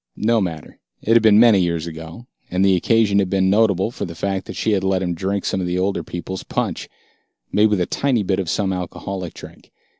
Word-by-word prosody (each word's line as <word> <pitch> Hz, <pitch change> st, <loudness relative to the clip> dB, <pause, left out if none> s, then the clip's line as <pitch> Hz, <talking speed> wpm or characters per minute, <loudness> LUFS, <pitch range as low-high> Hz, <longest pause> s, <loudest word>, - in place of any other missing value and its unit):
No 115 Hz, +1 st, +2 dB
matter, 80 Hz, -5 st, -5 dB, 0.2 s
it 115 Hz, -, +2 dB
had 115 Hz, -, +6 dB
been 110 Hz, -1 st, +6 dB
many 115 Hz, -4 st, +6 dB
years 85 Hz, -2 st, -1 dB
ago, 80 Hz, +6 st, -9 dB, 0.2 s
and 95 Hz, +2 st, +1 dB
the 95 Hz, -1 st, +4 dB
occasion 100 Hz, +2 st, +2 dB
had 95 Hz, -2 st, 0 dB
been 95 Hz, -1 st, +2 dB
notable 105 Hz, -1 st, +2 dB
for -, -, -6 dB
the 85 Hz, -, -6 dB
fact 95 Hz, +1 st, -3 dB
that -, -, -7 dB
she 110 Hz, -, 0 dB
had 100 Hz, -2 st, +1 dB
let 95 Hz, -1 st, +1 dB
him 90 Hz, -1 st, -1 dB
drink 95 Hz, +3 st, -2 dB
some 95 Hz, -, -1 dB
of 90 Hz, -, -2 dB
the 90 Hz, +1 st, -1 dB
older 95 Hz, +2 st, 0 dB
people's 90 Hz, +2 st, -6 dB
punch, -, -, -3 dB, 0.6 s
made 105 Hz, +1 st, +4 dB
with 105 Hz, -2 st, +1 dB
a 90 Hz, -, +1 dB
tiny 130 Hz, -2 st, 0 dB
bit 95 Hz, 0 st, 0 dB
of 90 Hz, -4 st, -3 dB
some 95 Hz, 0 st, 0 dB
alcoholic 90 Hz, 0 st, -5 dB
drink. -, -, -13 dB
95 Hz, 230 wpm, -20 LUFS, 90-105 Hz, 0.6 s, had